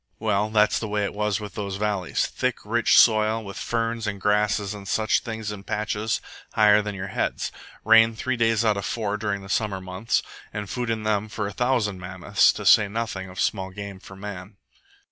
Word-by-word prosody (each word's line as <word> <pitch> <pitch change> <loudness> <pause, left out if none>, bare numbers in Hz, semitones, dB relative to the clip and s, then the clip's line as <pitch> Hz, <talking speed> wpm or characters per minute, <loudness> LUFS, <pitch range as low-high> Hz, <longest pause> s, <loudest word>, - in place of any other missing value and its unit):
Well, 105 -1 0
that's 105 -1 +3
the 110 - -4
way 105 0 -1
it 100 - -2
was 105 0 0
with 105 -3 -8
those 100 -2 -4
valleys. 100 -3 -1
Thick, - - -3
rich - - +3
soil, 110 0 +4
with 100 -1 -8
ferns 115 -1 -2
and 100 -1 -3
grasses 105 0 +1
and 100 -1 -9
such 110 +1 +2
things 110 -3 -5
in 100 -2 -8
patches 105 +1 -2 0.3
higher 105 -1 +5
than 105 -1 -5
your 95 0 -5
head. - - -1 0.5
Rain 115 +1 +6
three 130 +4 -1
days 115 -1 +2
out 105 -2 +3
of 100 - -3
four 105 -3 -2
during 100 -2 -2
the - - -10
summer 105 -1 -1
months; 95 +4 -1 0.3
and 105 -1 -5
food 120 +3 -3
in 110 -1 -1
them 110 0 0
for 105 0 -3
a 100 - -4
thousand 115 -6 0
mammoths, 90 0 +2
to - - -7
say 105 - +7
nothing 100 -3 -4
of 90 - -9
small 95 -2 0
game 100 0 -8
for 95 - -12
man. 95 0 -8
105 Hz, 200 wpm, -24 LUFS, 100-110 Hz, 0.5 s, say